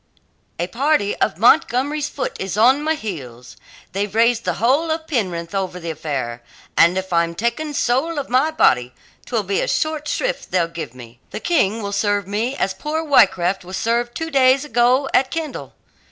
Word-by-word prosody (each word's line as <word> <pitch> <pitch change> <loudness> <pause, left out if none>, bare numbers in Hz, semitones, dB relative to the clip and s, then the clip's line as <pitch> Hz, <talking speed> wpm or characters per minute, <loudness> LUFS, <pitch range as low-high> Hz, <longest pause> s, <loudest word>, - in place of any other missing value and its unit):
"A 175 - -1
party 235 - 0
of - - 0
Montgomery's 265 +7 +2
foot 275 - -4
is 190 +1 -4
on 255 +6 +5
my 315 +1 0
heels. 130 - -8 0.4
They've 200 +2 -3
raised 230 0 +3
the 180 -2 0
whole 270 - +2
of 315 0 -2
Penrith 180 - -2
over 190 -2 -2
the 165 -1 -4
affair, 135 -7 -4 0.3
and 170 +2 +5
if 190 -1 -3
I'm 170 0 +1
taken, 235 - -2
soul 275 +7 0
of 280 - -3
my 260 +5 +2
body, 125 - +2 0.3
'twill 230 -4 -1
be 195 0 -1
a - - -1
short 310 -1 -1
shrift - - -2
they'll 180 -2 +1
give 165 -7 -7
me. 120 -1 -13
The - - -6
King 225 - +1
will 200 - -3
serve 205 -1 0
me 220 +6 -2
as 190 -6 -1
poor 305 +10 -3
Wrycraft 190 - +3
was 185 +1 -6
served 240 +1 -1
two 325 0 -4
days 265 +1 +4
ago 250 +1 +2
at 265 0 +3
Kendal. 320 -4 -5
225 Hz, 180 wpm, -20 LUFS, 180-280 Hz, 0.4 s, on